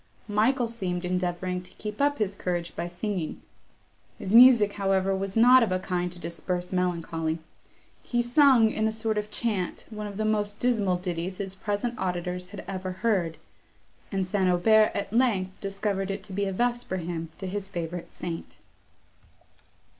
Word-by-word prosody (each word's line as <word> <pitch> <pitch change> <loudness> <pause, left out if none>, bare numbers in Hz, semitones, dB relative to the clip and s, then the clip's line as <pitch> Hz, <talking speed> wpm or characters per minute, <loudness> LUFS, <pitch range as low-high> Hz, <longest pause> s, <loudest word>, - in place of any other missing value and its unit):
Michael 230 +4 +2
seemed 185 -6 -3
endeavouring 180 0 -1
to 180 - -15
keep 210 +3 -5
up 285 0 +3
his 205 -2 0
courage 175 -3 -3
by 175 - -3
singing; 180 -1 -3 0.8
his 190 - -4
music, 235 -4 +8
however, 195 -1 +1
was 195 +2 -3
not 250 +3 +8
of 225 -5 +1
a 185 - +2
kind 180 -1 -2
to 175 - -8
disperse 180 +1 -4
melancholy; 165 -3 -1 0.6
he 240 - -2
sung, 245 -3 +5
in 220 0 0
a - - 0
sort 220 -1 -1
of 210 0 -5
chant, 210 -5 -2
one 210 -1 -5
of 200 -1 -8
the 215 - 0
most 210 -1 0
dismal 215 -7 +1
ditties 180 0 -4
his 195 -2 -4
present 205 +5 -3
auditors 180 0 -2
had 200 0 -9
ever 185 -1 -4
heard, 180 -8 +1 0.7
and 195 -2 0
St. 190 0 +1
Aubert 215 +5 +5
at 200 0 -3
length 220 -7 +2
discovered 195 -1 -2
it 195 - -4
to 195 - -9
be 200 +1 0
a 195 - -1
vesper 240 -1 -1
hymn 165 -2 -4
to 195 - -6
his 195 +1 -4
favourite 175 -2 -5
saint. 170 -2 -6
195 Hz, 170 wpm, -27 LUFS, 180-215 Hz, 0.8 s, music